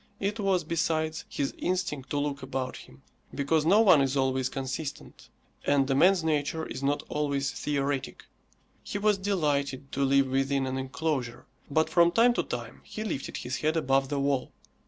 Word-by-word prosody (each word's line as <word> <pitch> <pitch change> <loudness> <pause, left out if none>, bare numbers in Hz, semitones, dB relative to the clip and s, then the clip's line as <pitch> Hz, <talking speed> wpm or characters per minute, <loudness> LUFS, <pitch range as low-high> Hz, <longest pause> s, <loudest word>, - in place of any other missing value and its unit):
It 205 +3 -2
was, 195 -3 +1
besides, 160 -1 -1
his 140 - -2
instinct 180 -7 -2
to 145 - -1
look 145 -1 -2
about 130 -1 -3
him, 65 +1 -14 0.3
because 150 +2 +1
no 205 +5 +6
one 185 -9 +6
is 135 +1 0
always 130 -1 +1
consistent, 135 +2 -6 0.3
and 140 -2 +2
a - - +4
man's 180 +5 +4
nature 155 0 0
is - - -6
not 140 +1 0
always 140 -2 -1
theoretic; 140 -1 -2 0.6
he - - -5
was 205 -1 +2
delighted 145 -9 -1
to 140 - 0
live 135 0 +4
within 135 +1 0
an 130 0 -2
enclosure, 130 -2 -3 0.2
but 155 +2 +2
from 170 -1 +4
time 235 +5 +5
to - - +1
time - - -6
he 215 - -6
lifted 140 -11 -4
his 125 +2 -4
head 155 +2 0
above 135 -3 +2
the 145 -1 -1
wall. 140 -2 0
145 Hz, 175 wpm, -28 LUFS, 135-165 Hz, 0.6 s, no